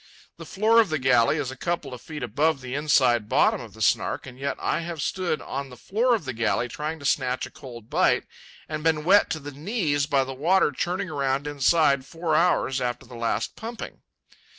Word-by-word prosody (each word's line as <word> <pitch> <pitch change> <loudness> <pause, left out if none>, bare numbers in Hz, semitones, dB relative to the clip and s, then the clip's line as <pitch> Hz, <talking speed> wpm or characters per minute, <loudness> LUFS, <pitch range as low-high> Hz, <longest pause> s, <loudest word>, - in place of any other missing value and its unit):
The - - -10
floor 225 +3 +4
of 220 - -1
the 155 - 0
galley 130 0 +3
is 140 -4 -2
a - - -8
couple 150 -2 -3
of 125 - -9
feet 150 -4 -7
above 140 +6 +1
the 125 0 -6
inside 130 -6 +2
bottom - - +3
of - - -11
the - - -3
Snark; - - +1
and 125 0 -11
yet 140 +1 -2
I - - 0
have 170 -1 -5
stood 165 +1 -2
on 140 0 -5
the 125 - -12
floor 235 - +1
of 205 - -5
the 130 - -3
galley, 115 +1 0
trying 150 +6 -4
to 140 - -11
snatch 130 -2 0
a - - -12
cold 120 -4 -11
bite, - - +2 0.4
and 155 -1 -4
been 160 -2 +2
wet 195 +5 +5
to 160 - -2
the 145 0 -8
knees 150 - -1
by 140 -3 +2
the 135 0 -6
water 165 +5 +2
churning 180 +5 -2
around 140 -1 -1
inside 145 -1 +3
four 165 +2 -2
hours 155 -6 +2
after 120 -1 -3
the 125 - -14
last 115 -2 -2
pumping. 230 +1 -8
145 Hz, 215 wpm, -25 LUFS, 130-165 Hz, 0.4 s, wet